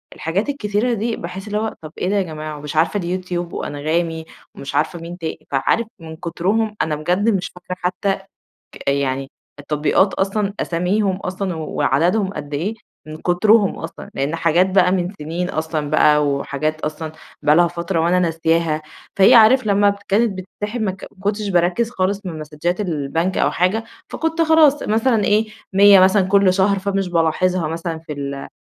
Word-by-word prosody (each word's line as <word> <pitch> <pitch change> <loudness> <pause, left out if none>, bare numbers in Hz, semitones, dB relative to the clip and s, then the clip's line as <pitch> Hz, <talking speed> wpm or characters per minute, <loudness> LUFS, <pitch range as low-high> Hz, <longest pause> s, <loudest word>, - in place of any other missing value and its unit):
الحاجات 190 - -2
الكثيرة 230 -2 0
دي 225 +1 -1
باحس 185 +4 -7
اللي 210 0 -2
هو 220 +1 -2
طب 155 -1 -9
إيه 180 - -1
ده 205 - +1
يا 200 - +3
جماعة، 155 -3 -6
ومش 150 +1 -7
عارفة 165 +6 +2
اليوتيوب 175 -1 -3
وأنغامي 160 +2 -2 0.3
ومش 140 - -7
عارفة 160 +3 0
مين 170 +1 -8
تا 165 -3 -4 0.2
فعارف 210 +11 +1
من 160 -1 -9
كترهم 200 +7 -1
أنا 155 -1 0
بجد 180 +8 +1
مش 185 -4 0
فاكرة 180 +1 -7
حتّى 185 +2 0 0.6
ك - - -7
يعني 135 -1 -1 0.3
التطبيقات 150 +6 +1
أصلًا 200 +1 -1
أساميهم 185 +3 0
أصلًا 185 -1 -4
وعددهم 165 +6 0
قد 145 -1 -7
إيه، 190 +10 -2 0.3
من 155 0 -7
كترهم 200 +5 +3
أصلًا، - - -8
لإن 140 +4 -1
حاجات 170 +3 +2
بقى 185 -1 +4
من 180 0 -1
سنين 165 +4 -3
أصلًا 155 -2 -3
بقى 150 -1 +4
وحاجات 145 +2 -2
أصلًا 155 +1 -4 0.3
بقى 150 +1 +4
لها 175 0 +5
فترة 170 0 -2
وأنا 175 +2 +2
ناسياها، 165 -2 +1 0.3
فهي 195 +3 +7
عارف 230 +2 +6
لمّا 200 0 +3
كانت 205 -1 +1
بتتسحب 210 +5 -5
ما 205 -3 0
ك 190 - -10
ما - - -27
كنتش 205 +1 -1
باركّز 180 +6 +1
خالص 200 -2 -1
من 160 -3 -5
مسدجات 155 +5 -3
البنك 165 0 -1
أو - - +2
حاجة، 195 +6 0 0.2
فكنت 325 +1 -1
خلاص 315 -3 +4
مثلًا 225 0 +1
إيه، 215 +1 +3 0.3
100 200 0 +7
مثلًا 190 +1 +5
كلّ 195 -1 +4
شهر 195 +1 +2
فمش 195 -1 -1
بالاحظها 170 0 +1
مثلًا 165 0 -4
في 160 -1 -8
ال 140 -1 -5
180 Hz, 170 wpm, -20 LUFS, 160-200 Hz, 0.6 s, فهي